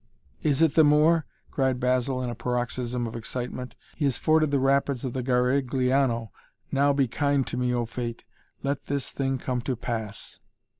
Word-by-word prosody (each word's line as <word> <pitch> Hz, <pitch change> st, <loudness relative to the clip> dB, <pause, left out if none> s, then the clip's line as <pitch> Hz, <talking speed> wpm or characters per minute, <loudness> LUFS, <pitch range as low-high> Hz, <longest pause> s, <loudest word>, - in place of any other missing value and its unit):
"It -, -, +1 dB
is 160 Hz, -3 st, +4 dB
the 160 Hz, -, +6 dB
Moor!" 155 Hz, +2 st, +4 dB, 0.2 s
cried 130 Hz, -2 st, +1 dB
Basil 125 Hz, +1 st, +1 dB
in 120 Hz, -, -2 dB
a -, -, -4 dB
paroxysm 120 Hz, +1 st, -2 dB
of 115 Hz, -, -6 dB
excitement. 125 Hz, +1 st, -5 dB, 0.2 s
"He 150 Hz, -, -1 dB
has 135 Hz, -4 st, +1 dB
forded 155 Hz, -1 st, +3 dB
the 140 Hz, -, +2 dB
rapids 135 Hz, -1 st, +1 dB
of 125 Hz, -, -3 dB
the 130 Hz, -, -2 dB
Garigliano. 125 Hz, -1 st, +1 dB, 0.4 s
Now 140 Hz, +1 st, +3 dB
be 140 Hz, -2 st, +2 dB
kind 140 Hz, +2 st, +1 dB
to -, -, -4 dB
me 125 Hz, 0 st, 0 dB
O 120 Hz, -1 st, 0 dB
Fate 115 Hz, 0 st, -5 dB, 0.4 s
let 140 Hz, 0 st, -2 dB
this 140 Hz, -1 st, -2 dB
thing 135 Hz, -1 st, -1 dB
come 125 Hz, -1 st, -2 dB
to 130 Hz, +1 st, -2 dB
pass!" 110 Hz, -3 st, -5 dB
130 Hz, 180 wpm, -26 LUFS, 120-140 Hz, 0.4 s, the